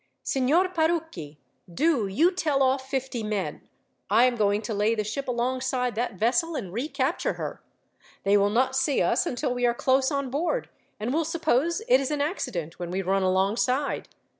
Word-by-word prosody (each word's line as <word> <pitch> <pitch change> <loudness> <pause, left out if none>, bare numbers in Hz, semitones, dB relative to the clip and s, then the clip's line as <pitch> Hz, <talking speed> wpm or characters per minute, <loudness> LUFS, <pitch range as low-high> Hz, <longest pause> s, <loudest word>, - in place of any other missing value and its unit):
"Signor 285 +8 +2
Parucchi, 320 - -2 0.3
do 270 - +1
you 310 - +3
tell 305 -7 +1
off 265 0 0
fifty 265 -3 -2
men. 210 -2 -3 0.5
I 235 - +5
am 250 -1 +2
going 205 -1 +1
to 220 - -3
lay 210 +2 +1
the 215 - -1
ship 220 +7 -4
alongside 250 0 -1
that 235 -1 -2
vessel, 270 - +1
and 190 -10 -5
recapture 275 - -1
her. - - -6 0.6
They 200 +1 +3
will 200 0 +4
not 255 +5 +1
see 265 +1 +2
us - - +1
until 255 -1 -1
we 245 0 -3
are 240 - +1
close 265 +1 +2
on 280 -3 -2
board, 345 - -1 0.3
and 225 +5 -2
will 325 +2 +2
suppose 330 - 0
it 255 - +5
is 270 - -2
an 300 -1 -1
accident 180 - -3
when 175 -1 -4
we 190 +2 -2
run 195 +2 +1
alongside. 205 +9 +1
255 Hz, 180 wpm, -26 LUFS, 210-290 Hz, 0.6 s, I